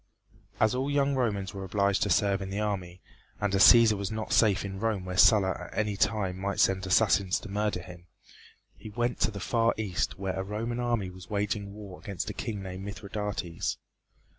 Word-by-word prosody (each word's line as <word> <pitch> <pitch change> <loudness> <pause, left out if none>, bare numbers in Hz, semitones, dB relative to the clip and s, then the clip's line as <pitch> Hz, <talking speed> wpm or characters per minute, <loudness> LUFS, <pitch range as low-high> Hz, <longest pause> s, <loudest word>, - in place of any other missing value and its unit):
As 110 +1 +3
all 130 +2 -1
young 140 -1 +2
Romans 105 -7 -1
were 100 -1 -6
obliged 100 +1 +1
to 105 - +1
serve 100 +2 +2
in 95 - -5
the 100 +2 -3
army, 95 -4 -3 0.4
and 105 -1 -1
as 95 - +3
Cæsar 115 -2 +8
was 100 -2 -3
not 110 0 -4
safe 100 -3 +3
in 95 0 -6
Rome 105 -4 -1
where 90 0 -5
Sulla 95 0 +5 0.2
at - - -12
any 105 -1 0
time 100 -2 0
might 100 +1 -2
send 95 -1 +2
assassins 95 -1 +3
to - - -9
murder 105 -3 -1
him, 90 0 -12 0.7
he 110 - -10
went 120 +3 -2
to - - +2
the 100 -2 -7
far 115 +4 +1
east 105 -5 -2
where 95 -1 -3
a - - -1
Roman 115 +4 -3
army 120 -6 -1
was 95 +2 -13
waging 100 -1 -2
war 100 -4 -10
against 100 -5 -5
a - - -8
king 105 -4 -5
named 95 0 -7
Mithridates. 100 -3 -4
100 Hz, 200 wpm, -28 LUFS, 95-110 Hz, 0.7 s, Cæsar